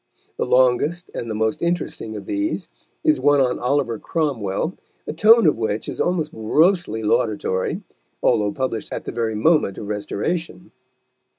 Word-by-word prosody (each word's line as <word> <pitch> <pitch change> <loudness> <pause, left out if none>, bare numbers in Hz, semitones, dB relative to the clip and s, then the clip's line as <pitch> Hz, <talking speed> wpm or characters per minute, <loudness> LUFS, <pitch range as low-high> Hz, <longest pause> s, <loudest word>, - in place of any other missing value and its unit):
The - - -1
longest 130 +8 +2
and 115 - -5
the 110 - -3
most 110 0 -1
interesting 170 -10 -2
of 105 - -7
these 310 +1 -2 0.3
is 310 -1 +3
one 145 0 +4
on 125 -2 +1
Oliver 125 -3 0
Cromwell, 140 - -2 0.3
the - - -4
tone 225 0 +6
of 150 -7 +3
which 110 -1 -2
is - - -3
almost 165 -4 0
grossly 150 - +1
laudatory, 105 -3 0 0.4
although 105 -1 +3
published 130 -4 -3
at - - -5
the - - -4
very 115 -2 -2
moment 130 - +2
of - - -6
Restoration. 160 - -3
130 Hz, 155 wpm, -22 LUFS, 110-170 Hz, 0.4 s, tone